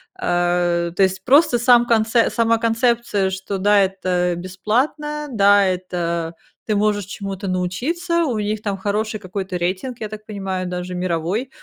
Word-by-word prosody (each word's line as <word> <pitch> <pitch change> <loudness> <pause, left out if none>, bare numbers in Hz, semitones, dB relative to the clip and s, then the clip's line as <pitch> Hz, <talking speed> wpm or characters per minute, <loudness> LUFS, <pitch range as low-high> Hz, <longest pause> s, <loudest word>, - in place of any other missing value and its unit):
а. 175 - 0
То 185 +3 +2
есть 190 0 0
просто 275 -2 +5
сам 240 0 +5
конц 225 -1 +2 0.2
сама 230 0 +2
концепция, 230 -3 +1
что 190 +1 -4
да, 205 +2 +4
это 185 -2 0
бесплатно, 250 - -2
да, 205 -2 +5
это, 170 -3 -2 0.3
ты 215 - 0
можешь 205 -1 +1
чему-то 195 0 -6
научиться, 305 - -1
у 245 -7 -1
них 210 0 -2
там 200 -2 -2
хороший 210 +2 -2
какой-то 185 -1 -4
рейтинг, 190 +8 -3
я 215 -2 -5
так 215 0 -9
понимаю, 195 -3 -4
даже 180 0 -5
мировой. 180 +7 -2
200 Hz, 150 wpm, -20 LUFS, 185-225 Hz, 0.3 s, просто